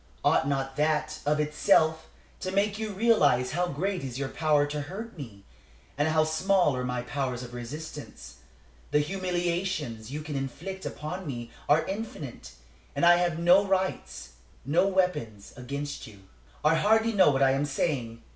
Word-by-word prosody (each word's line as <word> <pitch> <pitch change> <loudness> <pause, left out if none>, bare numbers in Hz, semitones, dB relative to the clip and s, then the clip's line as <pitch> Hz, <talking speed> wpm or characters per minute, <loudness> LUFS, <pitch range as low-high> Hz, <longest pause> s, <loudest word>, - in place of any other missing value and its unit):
Ought 135 - +3
not 135 -1 -2
that, 150 0 0
of 150 +1 +2
itself, 155 +1 +2 0.3
to 185 - -3
make 200 +2 +1
you 220 -1 -3
realize 190 - +3
how 180 +3 0
great 180 +3 -2
is 130 -2 -5
your 135 -1 -2
power 150 -1 +2
to 145 0 -3
hurt 205 +10 -7
me, 110 - -10 0.5
and 145 +2 +1
how 155 0 +3
small 160 0 +2
are 125 - -2
my 125 -1 -2
powers 125 -2 -3
of 120 0 -10
resistance? 120 - -8 0.5
The - - +2
humiliations 175 - -2
you 150 +2 -4
can 150 -1 -5
inflict 170 +9 -5
upon 170 +4 -6
me 120 -4 -5 0.2
are 155 +2 +4
infinite, 190 - -6 0.4
and 140 - +2
I 175 0 +7
have 175 -2 0
no 175 +4 +5
rights, 190 - -2 0.3
no 160 +8 +3
weapons, 180 - -1
against 140 +2 -5
you. 100 -3 -14 0.4
"I 155 - +6
hardly 220 +6 +3
know 190 -6 +6
what 135 -1 +2
I 135 - +5
am 135 +2 +1
saying. 130 -6 -2
150 Hz, 165 wpm, -28 LUFS, 135-185 Hz, 0.5 s, I